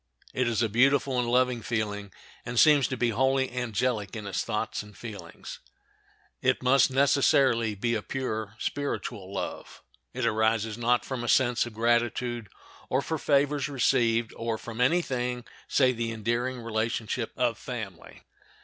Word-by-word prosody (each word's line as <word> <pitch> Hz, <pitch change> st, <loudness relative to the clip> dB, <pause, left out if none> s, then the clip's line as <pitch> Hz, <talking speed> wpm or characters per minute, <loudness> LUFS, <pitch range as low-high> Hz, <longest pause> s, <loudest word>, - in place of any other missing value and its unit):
It 125 Hz, -1 st, +1 dB
is 115 Hz, -1 st, +1 dB
a -, -, +2 dB
beautiful 130 Hz, +3 st, +3 dB
and 120 Hz, -1 st, 0 dB
lovely 125 Hz, -1 st, +2 dB
feeling, 105 Hz, -3 st, -3 dB, 0.3 s
and 120 Hz, 0 st, -1 dB
seems 150 Hz, -4 st, +6 dB
to 130 Hz, -, -4 dB
be 120 Hz, 0 st, +1 dB
wholly 130 Hz, +3 st, +1 dB
angelic 120 Hz, -3 st, -1 dB
in 105 Hz, -2 st, -6 dB
its 100 Hz, -2 st, -2 dB
thoughts -, -, -2 dB
and 105 Hz, -1 st, -14 dB
feelings. 110 Hz, -4 st, -9 dB, 0.8 s
It 130 Hz, 0 st, +1 dB
must 130 Hz, +1 st, +5 dB
necessarily 130 Hz, -4 st, +3 dB
be 115 Hz, +4 st, -1 dB
a 110 Hz, -, 0 dB
pure, 110 Hz, -4 st, -4 dB
spiritual 115 Hz, -8 st, -4 dB
love. 100 Hz, -, -6 dB, 0.3 s
It 125 Hz, -1 st, -2 dB
arises, 110 Hz, -1 st, +1 dB
not 120 Hz, +1 st, +1 dB
from 130 Hz, -3 st, -4 dB
a -, -, -4 dB
sense 120 Hz, -2 st, +3 dB
of 115 Hz, -, -10 dB
gratitude, 120 Hz, 0 st, 0 dB, 0.4 s
or 135 Hz, +2 st, +1 dB
for 160 Hz, -1 st, -3 dB
favors 145 Hz, 0 st, +2 dB
received, 115 Hz, -4 st, +2 dB
or 115 Hz, -1 st, -2 dB
from 115 Hz, +1 st, -6 dB
any 170 Hz, +8 st, +3 dB
thing 125 Hz, -3 st, -3 dB, 0.2 s
save 130 Hz, -3 st, +3 dB
the 115 Hz, -1 st, -2 dB
endearing 120 Hz, +3 st, -2 dB
relationship 115 Hz, +1 st, -2 dB
of 120 Hz, -2 st, 0 dB
family. 110 Hz, -9 st, -8 dB
120 Hz, 155 wpm, -27 LUFS, 110-130 Hz, 0.8 s, seems